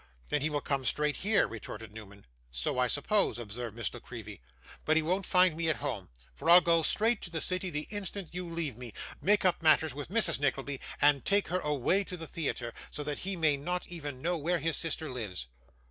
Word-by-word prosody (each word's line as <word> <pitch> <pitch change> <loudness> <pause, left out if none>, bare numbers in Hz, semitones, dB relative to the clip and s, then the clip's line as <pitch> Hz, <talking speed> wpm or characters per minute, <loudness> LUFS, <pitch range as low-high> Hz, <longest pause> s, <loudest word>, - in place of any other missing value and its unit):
'Then 150 - +1
he 155 - +1
will 145 -1 -1
come 135 -1 -1
straight 150 +3 +1
here,' 205 +1 +3
retorted 110 -1 -8
Newman. 100 -2 -11 0.2
'So - - -2
I 125 - +4
suppose,' 170 - +2
observed 115 0 -5
Miss 115 -5 -3
La 120 - -7
Creevy; 110 - -9 0.4
'but 155 +1 +3
he 160 - +3
won't 185 +4 0
find 180 -3 +5
me 165 0 0
at 155 - +3
home, 110 -5 -4 0.2
for 165 - -3
I'll 175 +1 +11
go 170 -1 +3
straight 220 +7 +2
to - - -7
the 165 -1 -3
city 185 +2 -2
the 150 -2 -3
instant 200 -3 -4
you 180 -1 -4
leave 165 -8 -3
me, 120 -3 -8 0.3
make 205 0 +3
up 180 -2 +3
matters 160 -2 +4
with 145 +2 -6
Mrs. 190 -7 +2
Nickleby, 140 -1 -1 0.2
and 145 -2 +5
take 200 0 +2
her 180 - +1
away 150 +5 +1
to 180 - -6
the 165 - -6
theatre, 135 -7 -3 0.2
so 150 - -5
that 145 0 -3
he 195 +1 -2
may 155 -4 +3
not 180 +5 -3
even 145 -6 -6
know 175 +1 +1
where 170 +4 +1
his 165 +1 0
sister 160 -1 -1
lives. 105 - -4
155 Hz, 220 wpm, -31 LUFS, 125-175 Hz, 0.4 s, I'll